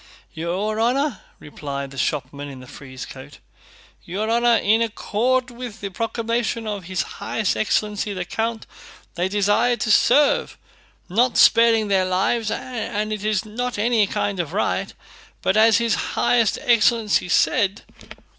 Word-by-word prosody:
"Your 185 +7 -2
honor..." 255 +1 +1 0.2
replied 140 -2 -7
the 135 - -11
shopman 140 0 -3
in 135 -2 -10
the 130 - -12
frieze 130 0 -10
coat, 135 +2 -12 0.7
"your 210 +6 -3
honor, 235 0 +4
in 220 +1 +2
accord 245 +3 0
with 240 -2 -8
the 200 - -5
proclamation 230 +2 -2
of 205 -4 -4
his 185 0 -2 0.2
highest 215 -4 -1
excellency 210 -1 -1
the 185 -2 -4
count, 225 +3 -3 0.5
they 180 +2 -1
desire 205 +4 +2
to 215 0 -1
serve, 280 +7 +3 0.5
not 240 +7 +1
sparing 230 -2 +5
their 190 -2 +2
lives, 195 +5 0
and 215 -4 -3
it 210 -1 -5
is 215 -2 0
not 245 +3 -4
any 220 -1 +2
kind 200 -1 -2
of 165 -4 -3
riot, - - -1 0.5
but 190 - +1
as 220 0 +5
his 235 -1 +1
highest 230 -4 +1
excellence 230 -2 +3
said..." 200 -4 +2
215 Hz, 145 wpm, -22 LUFS, 190-230 Hz, 0.7 s, sparing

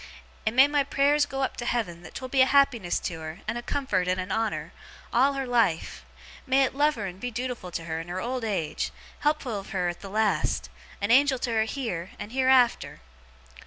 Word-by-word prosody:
And 220 - +1
may 265 +2 +8
my 290 -1 +2
prayers 285 +1 +2
go 270 0 -2
up - - -2
to 240 - -4
Heaven 200 -9 -2
that - - -13
'twill 260 -1 -5
be 265 0 +3
a 260 - +6
happiness 260 -10 +3
to 165 -2 -4
her, 160 +3 -7
and - - -1
a 240 - -3
comfort, 240 -10 -1
and 185 +1 +1
a 185 +1 -3
honour, 225 -1 -2 0.4
all 265 +4 +4
her 270 -1 -2
life! 230 -10 0 0.4
May 265 +1 +4
it 260 - 0
love 295 +2 +2
her 215 -4 -4
and 185 -1 -7
be 245 +3 -4
dootiful 240 -5 -4
to 165 - -3
her, 160 -1 -3
in 165 - -7
her 180 +1 -4
old 250 +3 -3
age; 195 -8 -2 0.3
helpful 285 -8 0
of 195 - -11
her 180 -2 0
at 175 - -6
the 195 - -8
last; 215 +1 0 0.3
a 205 - +1
Angel 270 +2 +5
to 245 -1 -2
her 220 -1 +2
heer, 220 -9 -4
and 210 - -7
heerafter! 260 - +3
240 Hz, 220 wpm, -27 LUFS, 185-265 Hz, 0.4 s, may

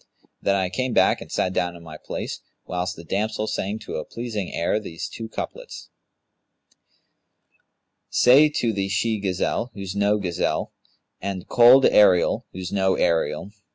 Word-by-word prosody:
Then 100 - +2
I 95 -2 0
came 130 +3 -2
back - - +3
and - - -10
sat 90 - 0
down 90 -1 -1
in 85 - -13
my 80 -1 -10
place, - - -6 0.3
whilst 90 +1 -3
the 85 - -11
damsel 110 +5 -2
sang 105 -1 -3
to - - -5
a - - -3
pleasing 115 -5 -5
air 85 +5 0
these 85 -6 -6
two 115 -1 -8
couplets, - - -7 2.2
'Say 140 +5 +6
to 120 -6 -1
the 100 -1 -2
she 110 +2 0
gazelle, 100 +5 -1
who's 100 -1 -6
no 100 +1 +2
gazelle, 90 -5 -2 0.2
* - - -49
And 95 -2 -5
Kohl'd 125 +2 +7
ariel 95 -4 +4
who's 90 -1 -6
no 95 -1 +2
ariel. 80 +1 0
100 Hz, 155 wpm, -23 LUFS, 90-110 Hz, 2.2 s, Kohl'd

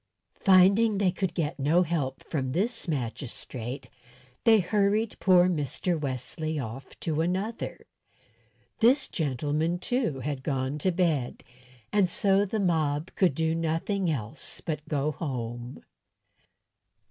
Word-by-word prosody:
Finding 200 +3 +5
they 195 -2 +3
could 185 -1 -2
get 155 -4 -2
no 160 +6 +4
help 145 -6 -2
from 130 -5 -2
this 225 - -1
magistrate, 125 -2 -4 0.6
they 225 -2 +7
hurried 205 +3 +1
poor 180 -1 +5
Mr. 170 +1 -1
Wesley 150 +2 -3
off 130 0 -7
to 160 -1 0
another. 190 +7 -3 0.9
This 260 +4 +4
gentleman, 150 +3 -1
too, 180 - -1
had 140 0 -3
gone 135 0 -2
to 185 +5 +1
bed, 165 -8 0 0.5
and 200 -3 +4
so 195 +2 +3
the 215 +2 -2
mob 160 -4 0
could 180 -8 +3
do 160 +1 +1
nothing 165 +4 0
else 135 -1 -4
but 155 -2 -5
go 150 0 0
home. 120 -4 -5
160 Hz, 125 wpm, -28 LUFS, 140-190 Hz, 0.9 s, they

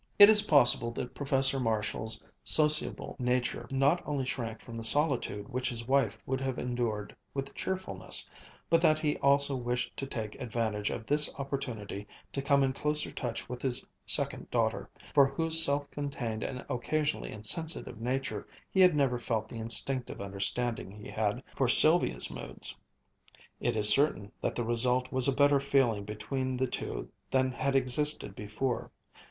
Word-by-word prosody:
It 205 0 +10
is 210 -1 +10
possible 135 - +5
that 125 - -6
Professor 135 -1 +2
Marshall's 110 -1 -1 0.2
sociable 150 -1 +3
nature 125 0 -1
not 140 +6 +2
only 140 -3 -3
shrank 115 -4 -4
from 115 - -10
the 115 - -6
solitude 120 -6 +1
which 130 +1 -2
his 115 -2 -5
wife 130 -6 +1
would 130 0 -2
have 130 -1 -3
endured 120 -4 -3 0.2
with 135 0 -4
cheerfulness, 185 - -3 0.4
but 165 0 +3
that 155 -2 +4
he 155 -1 -1
also 140 0 +2
wished 125 0 -3
to 135 - -4
take 110 -5 -5
advantage 110 -3 -2
of 110 - -5
this 150 +3 +2
opportunity 125 -8 -5 0.3
to 140 - -1
come 140 0 +3
in 130 -1 0
closer 150 +2 -1
touch 120 -4 -5
with 125 0 -7
his 125 -3 -1 0.2
second - - -2
daughter, - - -1 0.2
for 140 -1 +6
whose 165 +3 +2
self 145 -1 0
contained 125 -6 -4
and 125 0 -5
occasionally 145 +4 -2
insensitive 120 +2 -3
nature 125 -4 -3 0.2
he 190 - 0
had 180 -3 +6
never 135 -4 +1
felt 110 -2 -2
the 115 - -8
instinctive 120 +3 0
understanding 100 +3 -2
he 105 +1 -11
had 110 +4 -2
for 135 - +1
Sylvia's 155 - +5
moods. - - -4 0.8
It - - -1
is 105 -1 +6
certain 105 -5 +2
that - - -2
the 120 - -2
result 125 +2 +1
was 130 0 +3
a - - +3
better 145 +1 +3
feeling 130 -7 +1
between 130 +5 -4
the 130 - +1
two - - -5 0.2
than 130 -1 +1
had 135 +2 -2
existed 135 -3 +2
before. 110 +5 -3
130 Hz, 160 wpm, -30 LUFS, 115-140 Hz, 0.8 s, It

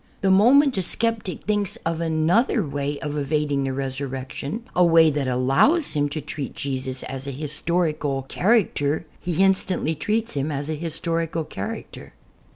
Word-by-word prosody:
The 195 - +3
moment 250 +5 +5
a - - +1
sceptic 220 0 0
thinks 205 -1 0
of 165 0 -1
another 170 +7 +2
way 145 0 -3
of 150 - -3
evadmg 145 -1 0
the - - -1
Resurrection 135 - -4
— - - -26
a 180 - +5
way 165 -2 +6
that 145 -2 -1
allows 135 - +3
him 145 -1 +1
to" 145 - -4
treat 145 -1 -6
Jesus 130 -2 -3
as 135 +1 -6
a - - -2
historical 150 -1 -1
character 165 - +1
— - - -29
he 175 +1 +1
instantly 190 -4 +1
treats 215 +8 -1
him 145 +1 -1
as 145 +1 -4
a - - 0
historical 165 +1 -2
character. 225 +8 -7
155 Hz, 160 wpm, -23 LUFS, 140-190 Hz, -, way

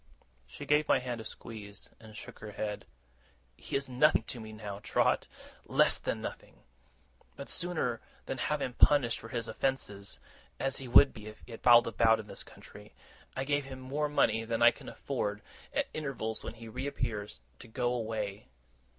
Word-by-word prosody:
She - - -9
gave 150 0 +3
my - - +5
hand 125 -2 -4
a - - -7
squeeze, 105 -2 -8
and 110 -1 -12
shook - - -10
her 105 -1 -8
head. 105 0 -3 0.7
'He - - -5
is 135 0 +1
nothing 130 0 +4
to 120 - -5
me 110 -1 -8
now, 105 -2 -6
Trot 105 - +2 0.4
less - - +3
than - - -2
nothing. - - -8 0.7
But, 140 - -8
sooner 160 -10 -1 0.2
than 130 - -4
have 150 +2 0
him 125 - -2
punished 125 -3 +5
for 115 - -10
his 115 -1 -2
offences 105 -5 -2 0.4
(as 135 0 0
he 135 - -6
would 135 +3 +8
be 105 -1 -10
if 110 - -11
he 115 - -8
prowled 120 0 +7
about 115 0 +4
in 110 - -6
this - - -7
country), - - -14 0.4
I 135 - 0
give 145 0 0
him 130 -1 -8
more 145 +3 -1
money 115 -6 +3
than 115 +1 0
I 120 - +9
can - - -10
afford, 105 -7 -3 0.3
at - - 0
intervals 130 -7 -2
when - - -6
he 115 0 -10
reappears, 110 - -3 0.2
to - - -11
go 120 +2 0
away. 110 - -3
115 Hz, 180 wpm, -32 LUFS, 110-135 Hz, 0.7 s, I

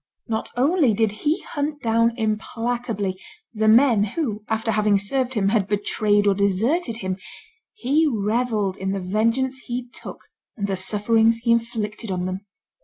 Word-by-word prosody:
Not 220 -2 -2
only 275 - +3
did 220 0 +2
he 295 +10 -1
hunt 290 -1 -4
down 230 +1 +2
implacably 220 -2 -2 0.3
the 220 -1 0
men 230 -1 +5
who, 215 -3 -3
after 220 0 0
having 210 -2 +3
served 255 +6 -2
him, 195 -2 +2
had 205 -3 +1
betrayed 205 0 +1
or 200 - +4
deserted 225 - +1
him; 185 0 -2 0.6
he 315 - +2
revelled 215 -4 0
in 190 0 -2
the 195 - -2
vengeance 230 +8 0
he 245 0 -4
took - - -10 0.4
and 200 - -2
the 195 -1 -1
sufferings 220 +4 +2
he 235 - +2
inflicted 225 -2 -1
on 180 -1 -2
them. 185 +2 -5
220 Hz, 155 wpm, -23 LUFS, 205-245 Hz, 0.6 s, men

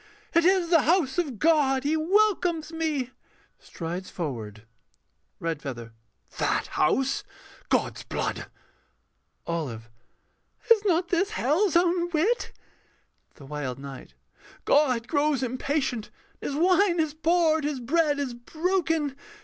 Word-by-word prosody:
It 335 0 +4
is 365 -2 +3
the 330 -3 +6
house 330 -3 +2
of 285 -9 -2
God. 275 -2 +3
He 295 +3 +1
welcomes 350 -2 +2
me. 310 -6 -2 0.5
[Strides 175 +2 -6
forward.] 115 - -5 0.8
REDFEATHER. 135 -8 -5 0.5
That - - +1
house. 270 - +1 0.5
God's - - 0
blood! - - -3 1.0
OLIVE 125 -10 -4 0.7
[hysterically]. 460 - +6
Is 420 - -10
not 350 -2 +2
this 380 +3 +1
hell's 370 - +1
own 345 0 +3
wit? 350 +9 0 0.8
THE 140 - -13
WILD 135 -3 -4
KNIGHT. 135 - -10 0.5
God 255 -5 +3
grows 285 -1 +1
impatient, 255 -2 -1 0.3
and - - -3
His - - -3
wine 365 0 +3
is 315 -2 0
poured, 320 -1 +2
His 290 -2 -2
bread 295 +4 +1
is 275 -4 -2
broken. 320 +2 -1
300 Hz, 120 wpm, -26 LUFS, 235-340 Hz, 1.0 s, the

